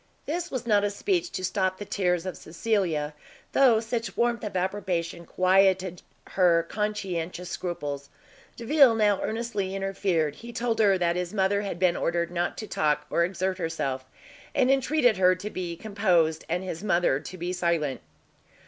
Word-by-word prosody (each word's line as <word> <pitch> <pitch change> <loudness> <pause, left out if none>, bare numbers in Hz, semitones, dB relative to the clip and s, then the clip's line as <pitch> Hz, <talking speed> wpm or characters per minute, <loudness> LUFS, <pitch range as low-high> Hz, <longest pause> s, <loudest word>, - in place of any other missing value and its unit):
This 345 +3 -3
was 255 -3 -4
not 205 -3 +3
a 205 - +2
speech 350 - -1
to 185 - -4
stop 185 0 0
the 205 - -6
tears 180 -4 0
of 185 - -4
Cecilia, 165 -4 -1 0.4
though 250 -5 +5
such 230 +1 -4
warmth 235 0 +1
of 210 -2 -5
approbation 180 -3 -2
quieted 185 -1 +2 0.3
her 170 -3 +3
conscientious 180 -4 -3
scruples. 145 -6 -4 0.5
Delvile 250 0 +5
now 210 -3 +2
earnestly 215 -4 -2
interfered; 190 -6 -1
he 235 +1 -9
told 235 -1 -1
her 200 -3 +5
that 170 -1 +1
his 180 +2 -3
mother 200 +1 +2
had 200 -4 -4
been 180 -1 +3
ordered 170 0 -1
not 175 0 -2
to 215 - -6
talk 150 -4 0
or 170 - +3
exert 185 +1 -2
herself, 140 -6 -2 0.5
and 260 0 +4
entreated 270 -3 +3
her 185 -1 +5
to 205 +4 -6
be 175 -2 -4
composed, 175 -6 +1
and 175 +3 -1
his 185 -1 -5
mother 175 -8 +2
to 185 - -9
be 175 +1 -3
silent. 170 -6 0
185 Hz, 165 wpm, -27 LUFS, 170-215 Hz, 0.5 s, though